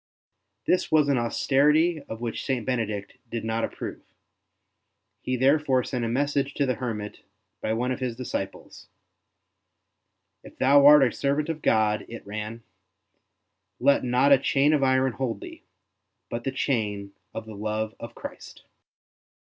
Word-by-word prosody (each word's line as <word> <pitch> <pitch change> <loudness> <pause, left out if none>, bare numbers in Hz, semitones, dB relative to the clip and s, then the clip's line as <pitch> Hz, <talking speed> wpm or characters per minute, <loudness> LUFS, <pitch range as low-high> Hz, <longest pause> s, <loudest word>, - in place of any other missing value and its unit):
This 180 - +1
was 150 -2 +4
an 135 -3 +3
austerity 150 +7 +2
of 110 +1 -6
which 120 -2 -3
St. 130 -5 -2
Benedict 110 -5 -3
did 115 -1 -4
not 115 0 -1
approve; - - -5 1.2
he 130 - -2
therefore 135 0 +3
sent 125 -1 -3
a - - 0
message 140 +2 0
to 140 - +1
the 130 - +1
hermit 110 -5 -5 0.4
by 110 - -1
one 125 +3 -1
of 130 - -3
his 125 -3 -3
disciples. 105 -6 -6 1.6
If - - -14
thou 140 +2 +6
art 150 -1 +9
a - - -3
servant 145 +5 -1
of 160 -2 -3
God,'' 105 -1 +2
it 115 - -9
ran, 105 +3 -6 0.6
'' - - -53 0.3
let 140 - +3
not 125 +3 +3
a 135 - +6
chain 140 +2 +2
of 150 - +2
iron 130 0 +3
hold 115 -4 -3
thee, - - -10 0.7
but 120 0 -4
the 135 - 0
chain 105 -7 -2 0.2
of 110 - -6
the 110 - -9
love 110 +1 -3
of - - -9
Christ.'' - - -10
125 Hz, 155 wpm, -26 LUFS, 110-140 Hz, 1.6 s, art